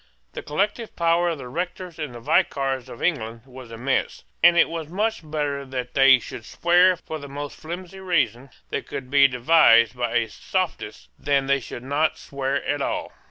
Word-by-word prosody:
The - - -5
collective 205 +8 -2
power 170 +1 +2
of 165 - -2
the 130 -3 -8
rectors 175 +4 -5
and 150 -6 -5
vicars 135 -2 0
of 120 - -9
England 115 -9 -1
was 130 -2 -12
immense: 125 +4 -2 0.2
and 175 0 +6
it - - +6
was 165 -2 -5
much 210 +6 -1
better 145 -2 -3
that 130 -2 -5
they 135 -1 +7
should 115 -1 -9
swear 175 +7 +3
for 160 -2 -7
the 140 - -9
most 145 +1 -6
flimsy 180 +3 -8
reason 145 - 0 0.2
that - - -3
could 130 -1 -7
be 140 -1 +7
devised 125 -3 +5
by 120 -1 -2
a 115 -1 +2
sophist 105 - -4
than 140 -1 +1
they 140 0 +2
should 120 -1 -9
not 145 +4 0
swear 135 0 -3
at 145 -1 -1
all. - - -2
140 Hz, 180 wpm, -23 LUFS, 130-170 Hz, 0.2 s, they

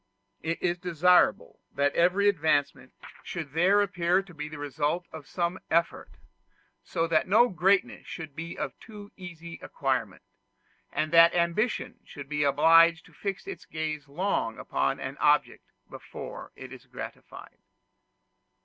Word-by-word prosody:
It 165 +1 -2
is 175 -1 0
desirable 180 +1 +2 0.2
that 145 0 +1
every 185 +4 +3
advancement 145 -7 +1 0.3
should 160 -5 -6
there 190 +5 +4
appear 180 -1 +1
to 185 -2 -15
be 150 -1 -6
the 155 - -8
result 145 +4 -2
of 155 -3 -10
some 175 +2 -2
effort; 170 +1 -1 0.7
so 165 -2 -1
that 165 -1 +1
no 230 +6 +5
greatness 190 +1 +1
should 160 -4 -8
be 165 +1 -6
of - - -3
too 205 -3 -12
easy 170 -3 -10
acquirement, - - -2 0.7
and 155 +2 -1
that 170 +1 +7
ambition 175 +7 0
should 145 -2 -10
be 150 0 0
obliged 165 +3 +5
to 165 - -19
fix 195 - -5
its 390 - -8
gaze 155 -2 -4
long 145 - -2
upon 70 0 -1
an - - -6
object - - +2 0.2
before - - -9
it - - -10
is - - -13
gratified. - - -10
170 Hz, 140 wpm, -28 LUFS, 155-180 Hz, 0.7 s, that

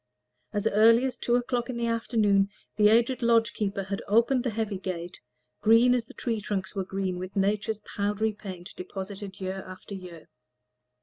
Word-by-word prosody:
As 205 -2 -2
early 230 +4 +5
as 260 - -2
two 240 - +1
o'clock 245 0 -1
in 250 - -3
the 235 - -1
afternoon 215 -4 +2 0.3
the 210 -1 +5
aged 235 +4 +3
lodge 230 -1 +3
keeper 200 -2 -2
had 195 +1 -4
opened 235 +4 +3
the 250 - 0
heavy 215 -3 -2
gate, 180 -2 -5 0.4
green 230 +3 +6
as 245 -2 0
the - - -15
tree 225 -3 -2
trunks 195 -2 -3
were 195 -2 -2
green 190 -1 -3
with 185 +1 -7
nature's 205 +2 0
powdery 210 +1 -1
paint, 190 -3 -9
deposited 195 +1 -7
year 190 0 -4
after 185 +2 -10
year. 180 -4 -9
210 Hz, 175 wpm, -27 LUFS, 195-230 Hz, 0.4 s, green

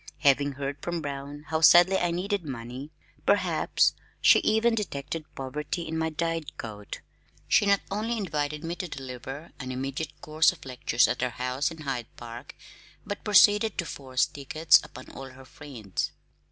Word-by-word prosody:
Having 140 -1 +3
heard 140 +1 -4
from 175 -1 -2
Brown 140 +1 -6
how 160 0 0
sadly 175 +3 +7
I 175 - +1
needed 190 +3 -1
money 130 0 -7 0.3
perhaps - - +2 0.3
she - - +7
even 225 +2 +2
detected 155 -7 -3
poverty 150 +5 -4
in 160 - -4
my 160 0 0
dyed 165 0 -3
coat, 105 -3 -7 0.5
she 205 - +4
not 200 -1 +4
only 220 +4 -1
invited 150 -5 -2
me 165 +1 -3
to 185 - -4
deliver 135 +1 -8
an 130 -2 -5
immediate 135 +4 -4
course 155 +1 +3
of - - -14
lectures 125 -2 +2
at - - -2
her 125 - +1
house 125 +3 -1
in 165 -2 -10
Hyde 130 -6 -3
Park 120 0 -9 0.5
but 205 - -5
proceeded 210 +1 +5
to 175 - -1
force 130 -4 -1
tickets 150 +2 +3
upon 130 - -11
all 135 0 -8
her 130 +1 -14
friends. 125 -9 -5
145 Hz, 165 wpm, -27 LUFS, 130-170 Hz, 0.5 s, sadly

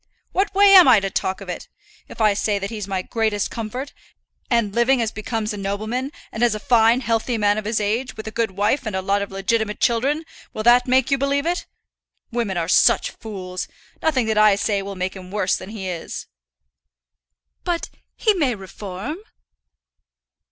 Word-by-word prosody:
"What 390 +1 0
way 400 0 +7
am 370 -5 +10
I 240 -5 +7
to 195 -1 -3
talk 190 +1 -2
of 195 - -9
it? 180 - -6 0.4
If - - -12
I 215 -1 +5
say 205 0 0
that 200 +2 -4
he's 210 -3 -5
my 190 -2 -2
greatest 220 -2 -1
comfort, 245 +5 -5 0.6
and 230 -5 +1
living 245 +3 +3
as 225 -2 0
becomes 215 0 -3
a - - -6
nobleman, 215 +7 -3 0.2
and 220 - -5
is 240 -3 +3
a - - -4
fine 230 +2 +4
healthy 230 0 0
man 205 0 +2
of 215 - -8
his 215 +1 0
age, 220 +5 -2
with 220 0 -7
a - - -4
good 230 0 0
wife 205 +7 0
and 210 - -3
a 190 - -1
lot 200 +1 +1
of 200 - -4
legitimate 210 +2 -1
children, 275 +7 +1 0.3
will 215 - -3
that 245 +2 +5
make 260 +1 +3
you 275 - +2
believe 280 +1 0
it? 350 +2 -1 0.6
Women 230 -6 -1
are 165 -1 -1
such - - +4
fools. 185 -4 -6 0.3
Nothing 270 -7 +2
that 220 -1 +1
I 215 -1 +6
say 200 0 0
will 195 0 -6
make 185 +1 -3
him 185 -1 -10
worse 195 -1 0
than - - -7
he 210 -3 -6
is." 175 -3 -5 1.4
"But 345 -1 -2 0.2
he 435 - +2
may 285 - +1
reform." 195 - -7
220 Hz, 195 wpm, -22 LUFS, 200-250 Hz, 1.4 s, am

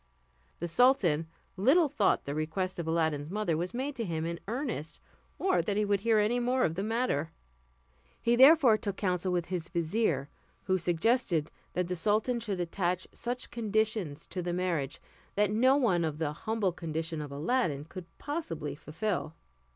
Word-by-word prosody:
The 175 - -3
sultan 175 - +3 0.3
little 275 - +4
thought 290 +1 +1
the 140 - -3
request 160 +5 -2
of 165 - -3
Aladdin's 160 -3 0
mother 205 -4 0
was 175 +3 -2
made 270 +4 -3
to 235 - -1
him 165 -5 -2
in 170 0 -3
earnest, 230 - -4 0.4
or 380 -1 +2
that 205 -1 -2
he 210 - +2
would 200 -1 +2
hear 225 +2 +3
any 215 +4 +2
more 250 +1 +1
of 160 - +1
the 185 - -3
matter. 215 - 0 0.9
He 235 +1 +2
therefore 265 -4 +7
took 200 -2 -3
counsel 185 -2 0
with 175 -1 -1
his 175 -2 -3
vizier, 170 - 0 0.4
who 185 0 +1
suggested 175 - +1 0.2
that 180 -1 0
the 180 - -2
sultan 215 +7 +1
should 205 -5 -3
attach 175 +1 -1
such 245 +1 -4
conditions 215 -8 -1
to 185 - -4
the 175 0 -2
marriage 170 -6 -1 0.4
that 210 0 +2
no 255 +5 +4
one 190 -11 +2
of 155 -2 -2
the 155 -2 -1
humble 215 +2 -1
condition 160 -1 -4
of 145 -1 -7
Aladdin 150 - 0
could 180 +2 -9
possibly 220 - -4
fulfill. 160 +2 -3
185 Hz, 170 wpm, -30 LUFS, 165-230 Hz, 0.9 s, therefore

